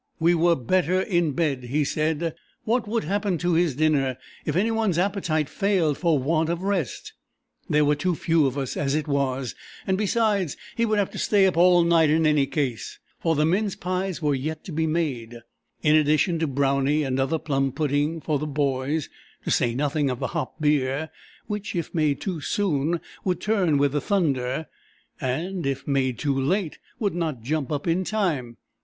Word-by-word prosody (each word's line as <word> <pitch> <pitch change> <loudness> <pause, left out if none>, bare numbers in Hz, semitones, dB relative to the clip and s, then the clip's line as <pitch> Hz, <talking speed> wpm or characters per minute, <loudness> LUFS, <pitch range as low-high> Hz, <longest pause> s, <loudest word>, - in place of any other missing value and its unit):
"We 170 +1 +4
were 170 0 +3
better 180 +7 +1
in 175 -6 +1
bed," 135 -5 -1
he 145 +5 0
said. 155 +2 -1 0.3
What 230 0 0
would 225 -1 -1
happen 195 +2 0
to 175 +1 0
his 165 -4 +2
dinner 140 -4 +1 0.3
if - - -1
any 210 +6 +2
one's 220 -6 +1
appetite 175 -5 0
failed 185 -7 +1
for 165 0 +2
want 160 +4 +1
of 170 +2 -2
rest? 195 -8 -2 0.6
There 150 0 +3
were 145 - +3
too 175 +4 0
few 160 -2 +2
of 135 +1 -3
us 135 -3 -3
as 140 0 0
it 155 0 -1
was, 135 -3 -1 0.3
and, 190 0 0
besides, 210 - +1 0.2
he 230 0 +1
would 215 -1 +1
have 200 -2 0
to - - -6
stay 200 -2 +3
up 185 - +2
all 175 0 +5
night 165 -2 +4
in 160 +1 +3
any 150 -3 +3
case, 130 -7 -3 0.2
for 165 -1 +1
the 150 +1 +2
mince 195 +4 +1
pies 185 -1 -3
were 145 -1 +2
yet 155 +4 -3
to - - -8
be 160 +1 0
made, 135 -8 -2 0.5
in 150 0 +5
addition 155 +3 +3
to 160 - 0
brownie 140 +2 +1
and 130 -1 -1
another 135 +5 +1
plum 135 -3 0
pudding 150 +3 0
for 150 -2 -1
the 150 - -3
"boys," 140 +1 -1 0.4
to - - -2
say 120 -1 +2
nothing 145 +1 0
of 125 - -2
the - - -1
hop 130 - -4
beer, 150 0 +1 0.3
which 210 -2 -4
if 170 - -3
made 155 -4 +1
too 180 -6 -4
soon 165 -3 0 0.2
would 180 -3 0
turn 190 -8 +2
with 140 0 +2
the 145 0 -1
thunder 140 -7 0 0.5
and 165 +6 -2
if 135 0 -3
made 130 -4 +1
too 145 -2 0
late 160 +6 -1 0.2
would 205 -5 -1
not 160 -9 -3
"jump 150 +2 -2
up" 145 -1 -2
in 175 +2 +1
time. 160 - -1
155 Hz, 190 wpm, -25 LUFS, 140-180 Hz, 0.6 s, all